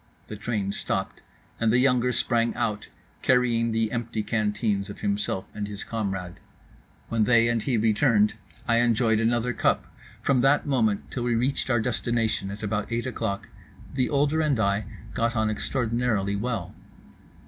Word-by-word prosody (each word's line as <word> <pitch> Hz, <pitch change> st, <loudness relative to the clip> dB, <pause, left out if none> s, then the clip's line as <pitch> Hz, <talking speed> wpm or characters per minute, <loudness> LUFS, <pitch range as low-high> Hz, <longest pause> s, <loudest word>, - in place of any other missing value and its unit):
The 110 Hz, -, -5 dB
train 105 Hz, -2 st, -2 dB
stopped; -, -, -2 dB, 0.4 s
and 115 Hz, -1 st, +2 dB
the 120 Hz, -, +4 dB
younger 125 Hz, -1 st, +3 dB
sprang 120 Hz, -1 st, +1 dB
out, 105 Hz, -2 st, -2 dB, 0.3 s
carrying 120 Hz, -2 st, +2 dB
the 110 Hz, -1 st, 0 dB
empty 115 Hz, -2 st, -2 dB
canteens 105 Hz, -1 st, 0 dB
of 100 Hz, -, -9 dB
himself 100 Hz, -2 st, -1 dB
and 105 Hz, -1 st, -4 dB
his 100 Hz, 0 st, -6 dB
comrade. 95 Hz, -5 st, -4 dB, 0.7 s
When 115 Hz, -2 st, +2 dB
they 115 Hz, -1 st, +5 dB
and 120 Hz, -1 st, +1 dB
he 125 Hz, -1 st, 0 dB
returned, 110 Hz, -1 st, +3 dB, 0.3 s
I 115 Hz, -1 st, +3 dB
enjoyed 115 Hz, -2 st, +3 dB
another 120 Hz, +1 st, +1 dB
cup. -, -, 0 dB, 0.3 s
From 135 Hz, -3 st, +3 dB
that 135 Hz, +3 st, +3 dB
moment 115 Hz, -8 st, 0 dB
till 125 Hz, -, -3 dB
we 120 Hz, -1 st, +1 dB
reached 130 Hz, +3 st, 0 dB
our 120 Hz, -3 st, +3 dB
destination 115 Hz, -3 st, 0 dB
at 100 Hz, +2 st, -7 dB
about 105 Hz, +1 st, -2 dB
eight 120 Hz, +1 st, -1 dB
o'clock 110 Hz, -5 st, -3 dB, 0.4 s
the 130 Hz, -2 st, +1 dB
older 145 Hz, +2 st, +2 dB
and 145 Hz, -6 st, +1 dB
I 100 Hz, 0 st, +1 dB, 0.3 s
got 115 Hz, +1 st, 0 dB
on 110 Hz, -1 st, +1 dB
extraordinarily 115 Hz, -4 st, 0 dB
well. 110 Hz, -4 st, -3 dB
115 Hz, 160 wpm, -26 LUFS, 105-125 Hz, 0.7 s, they